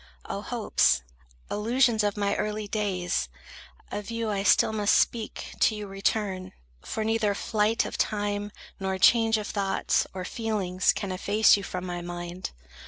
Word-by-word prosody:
O -, -, -4 dB
hopes, 65 Hz, -, +2 dB, 0.5 s
illusions 230 Hz, +1 st, +2 dB
of 205 Hz, 0 st, 0 dB
my 200 Hz, -1 st, +1 dB
early 210 Hz, 0 st, -2 dB
days!— 185 Hz, -, -1 dB, 0.6 s
Of 205 Hz, +1 st, -5 dB
you 230 Hz, -1 st, -2 dB
I 200 Hz, -1 st, -1 dB
still 200 Hz, +2 st, +4 dB
must 210 Hz, -1 st, +3 dB
speak, 225 Hz, -2 st, 0 dB
to 220 Hz, -, +4 dB
you 210 Hz, -1 st, -5 dB
return; 195 Hz, -1 st, -2 dB, 0.3 s
For 220 Hz, -, -3 dB
neither 220 Hz, -2 st, +1 dB
flight 215 Hz, +2 st, +1 dB
of -, -, -6 dB
time, 205 Hz, -1 st, -1 dB, 0.3 s
nor 190 Hz, -1 st, -1 dB
change 225 Hz, +3 st, +5 dB
of 210 Hz, -, -4 dB
thoughts, 200 Hz, -2 st, 0 dB
Or 185 Hz, -1 st, -5 dB
feelings, 195 Hz, -6 st, 0 dB
can 195 Hz, -2 st, -4 dB
efface 205 Hz, +4 st, +4 dB
you 200 Hz, -, -3 dB
from 185 Hz, -1 st, -5 dB
my 175 Hz, -1 st, -4 dB
mind. 175 Hz, +1 st, -5 dB
205 Hz, 155 wpm, -27 LUFS, 190-220 Hz, 0.6 s, change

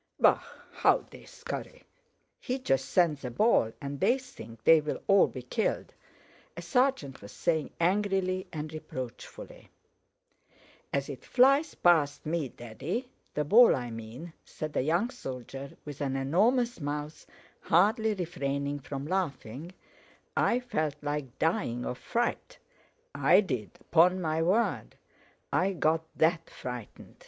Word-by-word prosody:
"Bah! -, -, +5 dB, 0.3 s
How -, -, +3 dB
they -, -, -13 dB
scurry. -, -, -7 dB, 0.6 s
He 255 Hz, 0 st, -2 dB
just 135 Hz, -, 0 dB
sends 160 Hz, -6 st, +2 dB
a 125 Hz, -, -3 dB
ball 120 Hz, -, +3 dB
and 140 Hz, 0 st, -5 dB
they 245 Hz, -, +3 dB
think 115 Hz, -, -12 dB
they'll 155 Hz, -2 st, +4 dB
all 200 Hz, -1 st, +5 dB
be 130 Hz, -, -8 dB
killed," 170 Hz, -, -2 dB, 0.6 s
a -, -, -4 dB
sergeant 250 Hz, -, +1 dB
was 100 Hz, -, -10 dB
saying 160 Hz, -3 st, 0 dB
angrily 185 Hz, +1 st, +1 dB
and 155 Hz, -1 st, -5 dB
reproachfully. 130 Hz, -6 st, -8 dB, 1.2 s
"As 140 Hz, 0 st, -1 dB
it 140 Hz, -3 st, -8 dB
flies 275 Hz, +5 st, +4 dB
past 155 Hz, -5 st, +3 dB
me, 155 Hz, -3 st, -1 dB
Daddy, 150 Hz, -, -5 dB, 0.2 s
the 150 Hz, -, +1 dB
ball 225 Hz, -, +7 dB
I 120 Hz, -2 st, -4 dB
mean," 115 Hz, +9 st, -8 dB
said 155 Hz, -1 st, -7 dB
a -, -, +2 dB
young 170 Hz, -, +1 dB
soldier 135 Hz, -, -8 dB
with 145 Hz, -1 st, -8 dB
an 135 Hz, -2 st, -1 dB
enormous 220 Hz, -, +2 dB
mouth, 150 Hz, +1 st, -5 dB, 0.3 s
hardly 215 Hz, +5 st, +3 dB
refraining 145 Hz, -6 st, -2 dB
from 140 Hz, 0 st, -6 dB
laughing, 155 Hz, -4 st, -3 dB, 0.6 s
"I 245 Hz, -, +2 dB
felt 155 Hz, -, -1 dB
like 145 Hz, -4 st, -3 dB
dying 160 Hz, -, 0 dB
of 125 Hz, -, -4 dB
fright. 240 Hz, -, -2 dB, 0.6 s
I -, -, +5 dB
did, 125 Hz, -, -4 dB
'pon 180 Hz, +3 st, +5 dB
my 160 Hz, -2 st, 0 dB
word, 195 Hz, +8 st, +1 dB, 0.6 s
I 195 Hz, +2 st, +2 dB
got 160 Hz, -2 st, +1 dB
that 165 Hz, +1 st, +2 dB
frightened!" 125 Hz, -4 st, -8 dB
160 Hz, 130 wpm, -29 LUFS, 135-195 Hz, 1.2 s, ball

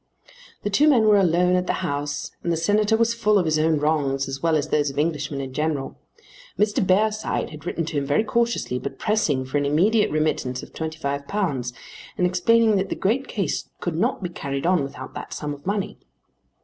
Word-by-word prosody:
The 205 Hz, -, -1 dB
two 290 Hz, +10 st, +4 dB
men 245 Hz, -6 st, +5 dB
were 210 Hz, -1 st, +6 dB
alone 180 Hz, 0 st, +3 dB
at 180 Hz, 0 st, 0 dB
the -, -, +1 dB
house 145 Hz, -2 st, -3 dB
and 170 Hz, -, -1 dB
the 165 Hz, -, +1 dB
Senator 210 Hz, +5 st, +2 dB
was 230 Hz, 0 st, +2 dB
full 215 Hz, -3 st, +2 dB
of 185 Hz, -, +2 dB
his 155 Hz, -1 st, +1 dB
own 160 Hz, 0 st, +3 dB
wrongs 145 Hz, -2 st, 0 dB
as 135 Hz, 0 st, -5 dB
well 165 Hz, -1 st, +2 dB
as 155 Hz, 0 st, 0 dB
those 145 Hz, -1 st, +2 dB
of 135 Hz, -, -9 dB
Englishmen 145 Hz, -2 st, -1 dB
in 130 Hz, -1 st, -6 dB
general. 150 Hz, -2 st, -2 dB, 0.6 s
Mr. 210 Hz, 0 st, +2 dB
Bearside 210 Hz, +3 st, +1 dB
had 155 Hz, +2 st, -10 dB
written 165 Hz, -2 st, -2 dB
to 160 Hz, -1 st, -3 dB
him 140 Hz, -, -3 dB
very 145 Hz, +9 st, +2 dB
cautiously, 235 Hz, -, 0 dB
but 140 Hz, -, -6 dB
pressing 160 Hz, -12 st, +1 dB
for 130 Hz, +3 st, -1 dB
an 145 Hz, -, -1 dB
immediate 200 Hz, +10 st, +3 dB
remittance 150 Hz, -5 st, -1 dB
of -, -, -12 dB
£25, 145 Hz, -, -2 dB, 0.5 s
and 180 Hz, -, +2 dB
explaining 215 Hz, +4 st, +3 dB
that 195 Hz, +1 st, -1 dB
the -, -, -2 dB
great 245 Hz, +7 st, 0 dB
case 195 Hz, -9 st, -2 dB
could 175 Hz, -3 st, -3 dB
not 215 Hz, +4 st, 0 dB
be 180 Hz, -, -2 dB
carried 140 Hz, -4 st, -4 dB
on 180 Hz, -2 st, +3 dB
without 135 Hz, -1 st, -7 dB
that -, -, -7 dB
sum 150 Hz, -1 st, -4 dB
of 145 Hz, +4 st, -12 dB
money. 200 Hz, 0 st, -2 dB
165 Hz, 205 wpm, -23 LUFS, 145-205 Hz, 0.6 s, were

